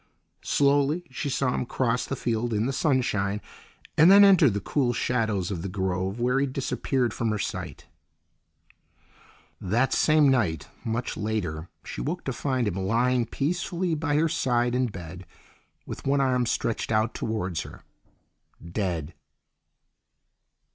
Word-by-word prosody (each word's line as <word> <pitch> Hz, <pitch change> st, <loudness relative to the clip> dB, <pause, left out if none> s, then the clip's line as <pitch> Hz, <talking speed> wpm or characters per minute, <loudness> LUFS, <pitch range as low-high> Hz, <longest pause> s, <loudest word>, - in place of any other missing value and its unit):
Slowly 145 Hz, +4 st, +2 dB
she 135 Hz, +2 st, -3 dB
saw 130 Hz, -1 st, 0 dB
him 125 Hz, -, -2 dB
cross 125 Hz, -1 st, 0 dB
the 135 Hz, -, -2 dB
field 120 Hz, -2 st, -1 dB
in 105 Hz, +2 st, +1 dB
the 135 Hz, -, -1 dB
sunshine, 105 Hz, -9 st, 0 dB, 0.6 s
and 160 Hz, +3 st, +7 dB
then 200 Hz, +1 st, +9 dB
enter 185 Hz, -7 st, +7 dB
the 100 Hz, -2 st, -2 dB
cool 120 Hz, +4 st, 0 dB
shadows 110 Hz, -7 st, -1 dB
of 90 Hz, -4 st, -3 dB
the 95 Hz, -, -4 dB
grove, 95 Hz, +2 st, -2 dB
where 125 Hz, +2 st, +2 dB
he 140 Hz, -, +1 dB
disappeared 130 Hz, -1 st, -1 dB
from 115 Hz, -, -1 dB
her 105 Hz, -, 0 dB
sight. 85 Hz, -7 st, -5 dB, 1.8 s
That 115 Hz, +8 st, +1 dB
same 155 Hz, -1 st, +4 dB
night, 105 Hz, -, +1 dB, 0.2 s
much 115 Hz, +2 st, -2 dB
later, 90 Hz, -7 st, -3 dB, 0.2 s
she -, -, -6 dB
woke -, -, -3 dB
to -, -, -3 dB
find 130 Hz, -5 st, -1 dB
him 100 Hz, -, -1 dB
lying 120 Hz, +5 st, +1 dB
peacefully 175 Hz, +5 st, -1 dB
by 150 Hz, -1 st, -1 dB
her 160 Hz, +2 st, +3 dB
side 120 Hz, -5 st, +1 dB
in 125 Hz, 0 st, +1 dB
bed, 90 Hz, -3 st, -9 dB, 0.6 s
with -, -, -7 dB
one 140 Hz, +1 st, +3 dB
arm 125 Hz, -3 st, +2 dB
stretched 115 Hz, 0 st, -1 dB
out 110 Hz, +1 st, +1 dB
towards 95 Hz, -6 st, -2 dB
her, -, -, -11 dB, 0.9 s
dead. 85 Hz, -5 st, -2 dB
120 Hz, 145 wpm, -26 LUFS, 100-135 Hz, 1.8 s, then